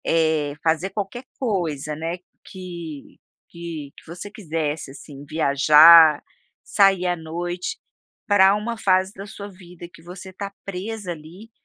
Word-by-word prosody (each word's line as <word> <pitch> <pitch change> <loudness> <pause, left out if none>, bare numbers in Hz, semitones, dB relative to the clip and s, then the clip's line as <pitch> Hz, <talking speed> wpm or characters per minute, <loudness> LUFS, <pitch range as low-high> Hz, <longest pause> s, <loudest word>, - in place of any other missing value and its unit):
É, 155 -3 +1
fazer 165 +3 +1
qualquer 205 +5 -5 0.2
coisa, 165 - -2
né, 165 +3 -4 0.3
que 170 -6 -10 0.3
que 165 -4 -8
que - - -16
você 175 +5 -9
quisesse, 160 -8 -4
assim, 140 0 -12
viajar, 155 +1 +7 0.4
sair 195 -3 +3
à 180 0 +1
noite, 175 - -5 0.5
pra 195 -1 +5
uma 230 +3 -4
fase 190 -2 +2
da 195 0 -9
sua 205 -1 -9
vida, 180 -2 -13
que 175 - -16
você 180 +2 -11
tá 200 +1 -6
presa, 200 0 -5
ali, 170 +8 -11
175 Hz, 135 wpm, -22 LUFS, 160-195 Hz, 0.5 s, viajar